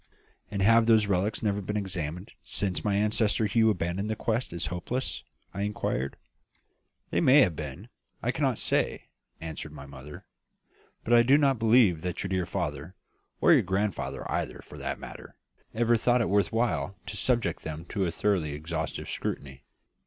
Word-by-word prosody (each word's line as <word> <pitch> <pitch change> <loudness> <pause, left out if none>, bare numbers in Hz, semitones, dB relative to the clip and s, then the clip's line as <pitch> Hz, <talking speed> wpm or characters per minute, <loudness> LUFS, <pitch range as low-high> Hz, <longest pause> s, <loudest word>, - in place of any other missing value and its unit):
"And 100 -1 -1
have 115 +2 +5
those 110 -2 +5
relics 100 +2 0
never 100 -1 0
been 105 +2 -3
examined 90 -2 -4
since 95 -3 -2
my 105 -2 +1
ancestor 105 +1 +2
Hugh 110 +1 +3
abandoned 90 +1 -1
the 110 - 0
quest 115 +3 -1
as 85 -1 -3
hopeless?" 125 +9 -3 0.3
I 100 - -4
inquired. 100 -9 -2 1.0
"They - - +2
may 145 -2 +7
have 90 -10 +3
been; 75 -3 -7 0.4
I - - +1
cannot - - 0
say," - - 0 0.3
answered 80 -1 -6
my 70 -2 -9
mother. 70 +1 -11 0.8
"But 120 - +1
I 120 - +8
do 130 +4 +5
not 135 -4 +2
believe 110 -7 +4
that 90 0 -3
your 95 - -3
dear 95 -2 -1
father 75 +1 -4 0.5
or - - +7
your - - +6
grandfather 95 0 -2
either, - - -3
for - - -12
that - - -3
matter - - -10 0.4
ever 120 +1 +3
thought 120 +2 +3
it 115 - 0
worth 100 0 +2
while 100 -7 0
to 95 - -6
subject 120 +3 +1
them 80 +1 -6
to 100 -3 0
a - - -2
thoroughly 85 -5 0
exhaustive 80 +3 -4
scrutiny. 65 -2 -5
100 Hz, 170 wpm, -28 LUFS, 85-110 Hz, 1.0 s, I